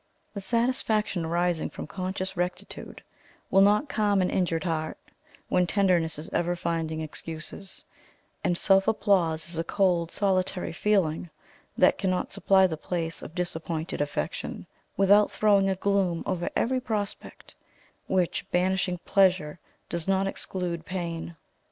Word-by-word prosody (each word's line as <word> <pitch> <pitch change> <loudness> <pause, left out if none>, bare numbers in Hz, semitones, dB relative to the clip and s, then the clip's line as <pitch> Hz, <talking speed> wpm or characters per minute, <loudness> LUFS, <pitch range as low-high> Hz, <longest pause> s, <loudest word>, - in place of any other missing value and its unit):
The 200 - -5
satisfaction 220 -5 +1
arising 175 0 0
from - - -7
conscious 190 +2 -4
rectitude, 180 +1 -5 0.5
will 195 - +6
not 210 +8 +4
calm 205 -5 +1
an 180 - 0
injured 170 -3 0
heart, 160 -3 -2 0.5
when 180 -1 +2
tenderness 175 -5 +2
is 150 - -6
ever 175 +1 +1
finding 165 -2 -2
excuses; 160 +4 -6 0.6
and 175 - +1
self 195 +1 +4
applause 170 -7 +2
is 165 -1 -3
a - - +1
cold 175 -2 +1
solitary 185 -3 0
feeling, 180 -4 +1 0.5
that - - +4
cannot 185 -2 -1
supply 190 -1 +4
the 165 -4 -1
place 165 0 -3
of 160 - -10
disappointed 165 -3 -3
affection, 145 - -3 0.3
without 200 +2 +5
throwing 200 -2 +3
a 190 - +1
gloom 190 -3 0
over 175 -1 -1
every 260 +2 +1
prospect, 210 -5 -4 0.5
which, 185 0 0
banishing 185 0 +1
pleasure, 185 -5 +2 0.3
does 170 0 -3
not 195 0 +2
exclude 180 -3 -3
pain. 170 0 -4
180 Hz, 135 wpm, -27 LUFS, 165-195 Hz, 0.6 s, will